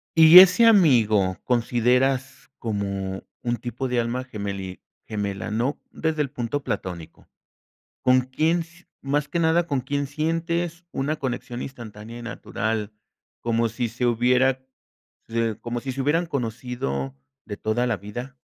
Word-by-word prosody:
Y 165 +2 +11
ese 185 +5 +7
amigo, 115 - +4
consideras 125 +3 +1
como 100 -3 -3 0.2
un 120 0 -1
tipo 120 +3 -4
de 125 -1 0
alma 120 +2 -1
gemeli 100 -5 -6 0.3
gemela, 100 -1 -3
¿no? 120 +7 -1
Desde 160 -1 -1
el 140 - -1
punto 135 +2 -3
platónico. 90 -8 -5 0.8
¿Con 130 0 +5
quién 155 +7 +1
s 170 +2 -11
más 145 +2 -1
que 170 - -2
nada? 165 +1 +3
¿Con 140 -5 0
quién 140 +2 -2
sientes 165 +3 -2
una 145 +3 -1
conexión 125 -2 -4
instantánea 115 -3 -9
y 120 - -9
natural, 110 -2 -3 0.5
como 115 0 +1
si 120 +2 -2
se 125 +2 -2
hubiera 125 +2 +3 0.7
se 115 -2 -1
como 120 0 -4
si 130 +2 -4
se 135 +1 -3
hubieran 165 +5 +1
conocido 115 - -3 0.3
de 105 - -5
toda 115 +4 0
la 115 - 0
vida? 120 +7 -8
125 Hz, 145 wpm, -24 LUFS, 110-145 Hz, 0.8 s, Y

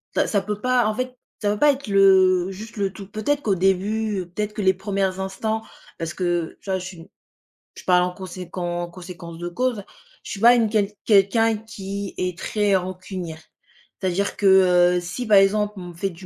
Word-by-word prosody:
Ça - - +2
ça 200 -2 +1
peut 210 +1 -4
pas 255 -2 +2
en 215 - -1
fait, 255 0 -3 0.3
ça 205 -1 +1
peut 210 - -5
pas 295 -1 +6
être 270 -3 -9
le 190 -2 +5
juste 215 +3 -9
le 195 -1 -1
tout. 200 - -9
Peut-être 235 +8 -1
qu'au 200 -6 +1
début, 195 +3 0
heu, - - -7
peut-être 210 +3 -3
que 210 - -4
les 190 0 +4
1res 190 -1 -2
instants 215 +3 -2 0.4
parce 165 0 -3
que, 175 -3 -2
tu 195 - -10
vois? 190 0 0
Je 180 - -7
suis 185 -2 -8
une 165 - -13 0.7
je - - -11
parle 180 -1 +4
en 180 - -1
conséquen 180 -1 -8
en 175 0 -3
conséquence 170 -2 -10
de 175 0 -5
cause. 235 +1 -1 0.4
Je - - -8
suis 195 - -5
pas 240 +2 +7
une 230 -2 +3
quel 210 -2 +1 0.2
quelqu'un 220 +2 +4
qui 200 -3 -7
est 180 -1 -2
très 205 0 +1
rancunière. 185 -3 -4 0.6
C'est-à-dire 190 +2 -1
que, 205 - -2 0.5
heu, - - +2
si 180 +7 -5
par 205 -2 +6
exemple, 210 +1 +3
on 180 -1 -7
me - - -10
fait 195 +3 -2
du 180 +3 -13
195 Hz, 215 wpm, -23 LUFS, 180-215 Hz, 0.7 s, pas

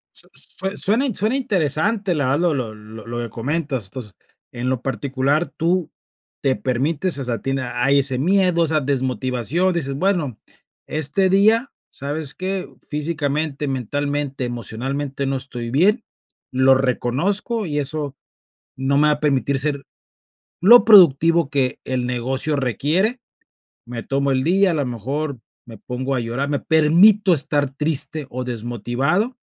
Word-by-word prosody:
Su - - -8
sue 190 +1 -7
suena 225 +8 +1
in 245 -7 -2
suena 215 +6 0
interesante 200 - 0
la 145 -3 0
verdad 135 +4 +1
lo 175 -2 +2
lo 125 -6 -3
lo 110 +1 -12
lo 120 0 -4
que 120 -1 -4
comentas 135 +1 -3
entonces 105 +1 -8 0.4
en 125 +1 -3
lo 130 -2 -1
particular 140 +4 -1
tú 170 +1 -1 0.5
te 135 -2 +1
permites 145 +7 0
o - - -3
sea 120 -2 -2
a - - -9
ti 135 - -2 0.2
hay 135 +3 +3
ese 135 -2 +1
miedo, 180 +1 +2
esa 155 -1 +1
desmotivación, 130 - -1
dices 145 -5 -2
bueno, 160 - -1 0.5
este 155 +6 +2
día, 220 +7 +3 0.2
¿sabes 145 +1 -4
qué?, 190 0 -4 0.2
físicamente, 150 -1 -2
mentalmente, 140 +1 -2
emocionalmente 135 +4 -4
no 135 0 -1
estoy 125 -3 -5
bien, 200 - +3 0.5
lo 130 +1 +4
reconozco 155 - 0
y 150 -3 -2
eso 145 -1 -3 0.6
no 135 +1 0
me 150 +1 +4
va - - +4
a 145 - -10
permitir 140 -2 +1
ser 140 -1 -1 0.8
lo 235 +7 +8
productivo 165 -6 +6
que 135 -3 0
el 130 -1 -2
negocio 130 +4 0
requiere, 150 - 0 0.7
me 120 -1 -6
tomo 140 0 0
el 130 -1 +1
día, 190 +3 +3
a - - -1
lo 145 -3 -1
mejor 130 +4 -4 0.3
me 115 -2 -11
pongo 130 +5 -4
a - - 0
llorar, 120 +5 -3
me 145 -1 0
permito 180 +6 +4
estar 145 -1 0
triste 150 +1 +1
o 130 0 -4
desmotivado, 125 - -2
140 Hz, 155 wpm, -21 LUFS, 130-170 Hz, 0.8 s, lo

